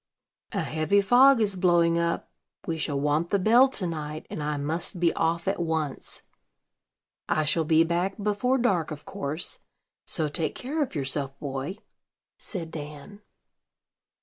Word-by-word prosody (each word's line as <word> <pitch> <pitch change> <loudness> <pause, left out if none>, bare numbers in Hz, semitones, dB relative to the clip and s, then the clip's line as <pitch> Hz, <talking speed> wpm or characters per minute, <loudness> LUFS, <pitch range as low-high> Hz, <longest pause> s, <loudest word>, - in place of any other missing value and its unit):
"A - - 0
heavy 160 +6 +1
fog 245 +5 +6
is 205 -3 +2
blowing 170 -2 +3
up: 170 0 -1 0.3
we 165 - -1
shall 145 -2 -1
want 150 +4 +1
the 200 - +3
bell 230 +7 +6
to 215 -8 -2
night, 155 -2 -4
and - - -4
I 150 0 -1
must 160 +6 -2
be 170 -1 +3
off 165 +1 0
at 195 - 0
once. 160 -4 -2 1.1
I 155 - +2
shall 160 +2 +2
be 160 +1 +5
back 175 +3 -1
before 210 +5 +1
dark, 190 - +1
of 150 -2 -8
course; 145 +5 -4 0.5
so 160 -2 0
take 155 +1 -2
care 295 +5 -3
of 270 -10 -2
yourself, 135 -1 -2
boy," 140 +6 -4 0.6
said 165 -6 -5
Dan. 150 +6 -8
165 Hz, 150 wpm, -27 LUFS, 150-195 Hz, 1.1 s, fog